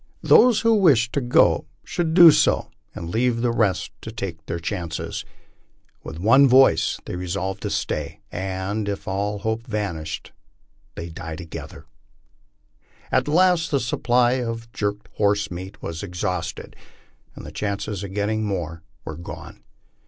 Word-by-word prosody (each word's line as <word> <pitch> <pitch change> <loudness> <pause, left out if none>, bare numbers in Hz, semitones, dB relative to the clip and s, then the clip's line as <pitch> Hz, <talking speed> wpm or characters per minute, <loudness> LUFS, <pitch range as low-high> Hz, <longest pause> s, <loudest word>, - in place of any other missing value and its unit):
Those 240 -4 +6
who 230 0 +4
wished 145 - +4
to 140 - 0
go 120 -1 +3 0.2
should 165 -2 -2
do 170 -3 +10
so - - +2 0.2
and 85 0 -6
leave 120 +1 +1
the 120 -1 +2
rest 110 -6 0
to 110 - -7
take 90 -7 -6
their 85 - -2
chances." 85 -2 -4 0.8
With 80 - -7
one 115 +10 +6
voice 130 +1 +4
they - - -5
resolved 95 +2 -3
to - - -3
stay, - - -3
and, 95 +3 -3
if 100 - -5
all 100 +2 -1
hope 110 +4 -3
vanished, 95 -8 -4 0.6
to 85 - -6
die 80 -1 -6
together. 85 0 -9 1.3
At - - +2
last 175 +1 +3
the 140 - +1
supply 120 +1 +2
of 115 -1 -5
jerked 105 0 -3
horse 100 -1 +1
meat 95 +4 -8
was 80 0 -5
exhausted, 90 -3 -4 0.6
and - - -10
the - - -8
chances 100 -1 -3
of 100 - -6
getting 110 +1 0
more 85 -6 -3 0.2
were 80 - -6
gone. 85 - -9
105 Hz, 145 wpm, -23 LUFS, 90-120 Hz, 1.3 s, do